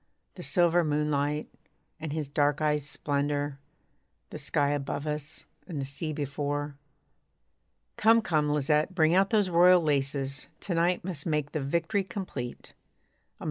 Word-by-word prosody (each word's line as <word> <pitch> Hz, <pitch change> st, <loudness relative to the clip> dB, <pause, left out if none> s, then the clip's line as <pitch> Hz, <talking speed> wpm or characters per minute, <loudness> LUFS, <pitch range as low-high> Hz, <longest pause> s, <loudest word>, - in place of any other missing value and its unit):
The -, -, -10 dB
silver 175 Hz, -2 st, +3 dB
moonlight, 150 Hz, -1 st, 0 dB, 0.5 s
and 160 Hz, -1 st, -5 dB
his 155 Hz, -1 st, -2 dB
dark 145 Hz, 0 st, +1 dB
eyes' 150 Hz, -2 st, 0 dB
splendour, 145 Hz, 0 st, -1 dB, 0.7 s
The -, -, -6 dB
sky 145 Hz, -1 st, +1 dB
above 145 Hz, 0 st, -2 dB
us, 150 Hz, -1 st, -5 dB, 0.2 s
and 165 Hz, -6 st, -4 dB
the 135 Hz, -, -2 dB
sea 140 Hz, +4 st, -4 dB
before.) 145 Hz, 0 st, -3 dB, 1.2 s
Come, 225 Hz, +1 st, +5 dB
come, 155 Hz, -5 st, +1 dB
Lisette, 150 Hz, +4 st, +1 dB
bring 160 Hz, -2 st, +4 dB
out 195 Hz, +2 st, +4 dB
those 205 Hz, -5 st, +2 dB
royal 180 Hz, +1 st, +7 dB
laces; 140 Hz, -2 st, 0 dB
To 190 Hz, -, -3 dB
night 170 Hz, +2 st, +1 dB
must 170 Hz, -6 st, -5 dB
make 150 Hz, -2 st, 0 dB
the 155 Hz, -, -2 dB
victory 170 Hz, +8 st, 0 dB
complete. 170 Hz, -10 st, -6 dB
150 Hz, 140 wpm, -28 LUFS, 145-170 Hz, 1.2 s, royal